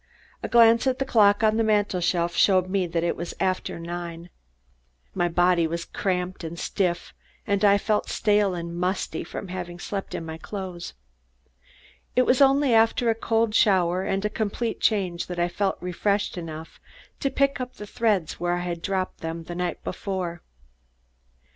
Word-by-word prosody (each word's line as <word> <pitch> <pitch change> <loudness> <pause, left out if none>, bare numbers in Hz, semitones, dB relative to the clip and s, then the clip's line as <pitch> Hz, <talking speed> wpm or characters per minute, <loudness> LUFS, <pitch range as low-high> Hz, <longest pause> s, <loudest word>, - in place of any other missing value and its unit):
A - - -3
glance 230 +1 +5
at 255 -1 +1
the 270 - -1
clock 210 -4 +4
on 220 0 +3
the 225 - +3
mantel 205 -4 +1
shelf 170 0 0
showed 185 -1 +3
that 175 -4 0
it 170 - 0
was 170 +1 -6
after 185 -2 -1
nine. 170 0 -6 0.8
My 175 - +1
body 175 -1 +3
was 170 +1 -4
cramped 180 -1 -2
and 165 +1 -6
stiff 175 -1 -2 0.3
and 200 0 0
I 200 -1 +6
felt 210 +1 0
stale 205 -3 +2
and 170 0 -5
musty 180 -2 -2
from 185 +3 -7
having 175 -1 -5
slept 195 +2 -5
in 165 - -5
my 160 0 -7
clothes. 185 -2 -6 1.2
It 255 - +5
was 250 +2 +3
only 275 -1 +5
after 225 +1 +4
a - - +2
cold 225 0 0
shower 185 -5 +3
and 195 +1 -1
a - - +1
complete 220 +1 -2
change 185 -5 +1
that 180 - -5
I 175 0 +2
felt 195 +3 -1
refreshed 200 +4 -1
enough 160 -2 -8 0.4
to 275 - 0
pick 275 0 +1
up 250 0 -6
the 210 - -8
threads 205 -6 0
where 175 0 0
I 175 - -2
had 175 -1 -4
dropped 190 -1 -2
them 165 0 -5
the 175 - -7
night 180 0 -3
before. 180 -4 -4
185 Hz, 175 wpm, -25 LUFS, 175-210 Hz, 1.2 s, I